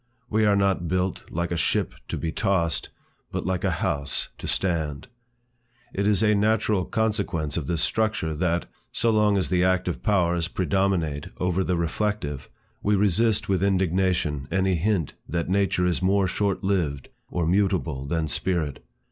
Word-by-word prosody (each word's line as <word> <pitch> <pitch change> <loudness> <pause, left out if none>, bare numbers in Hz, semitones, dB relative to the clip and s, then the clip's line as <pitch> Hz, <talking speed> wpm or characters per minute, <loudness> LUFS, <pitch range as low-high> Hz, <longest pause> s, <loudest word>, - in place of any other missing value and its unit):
We 110 0 +3
are 100 - +4
not 95 -3 +1
built 90 +1 -1
like 85 +1 -2
a - - 0
ship - - 0
to - - -3
be 80 - -2
tossed, 90 -4 0 0.4
but - - -3
like 95 -1 -1
a - - +2
house 70 -1 -2
to - - -6
stand. 80 -6 -1 0.9
It 100 +1 0
is 105 -1 +3
a 105 -1 +4
natural 105 -2 +2
consequence 100 -9 -1
of 80 -5 -2
this 85 -2 +1
structure, 110 -8 0
that, 85 +2 0 0.3
so 115 - +1
long 105 -2 +3
as 95 - 0
the 90 -1 +2
active 90 -1 +1
powers 85 -5 +2
predominate 90 -5 0
over 90 +1 0
the 90 -1 0
reflective, 85 -5 -2 0.3
we 105 0 +2
resist 105 +2 +2
with 95 -2 +1
indignation 90 -6 +1
any 95 0 +1
hint 90 -2 0 0.2
that 85 0 -2
nature 95 -2 +2
is 90 0 0
more 95 +1 +3
short 100 +1 -1
lived 85 -9 -1 0.2
or 85 -2 -1
mutable 90 -7 0
than 80 +1 0
spirit. 80 -5 -1
90 Hz, 160 wpm, -25 LUFS, 85-100 Hz, 0.9 s, are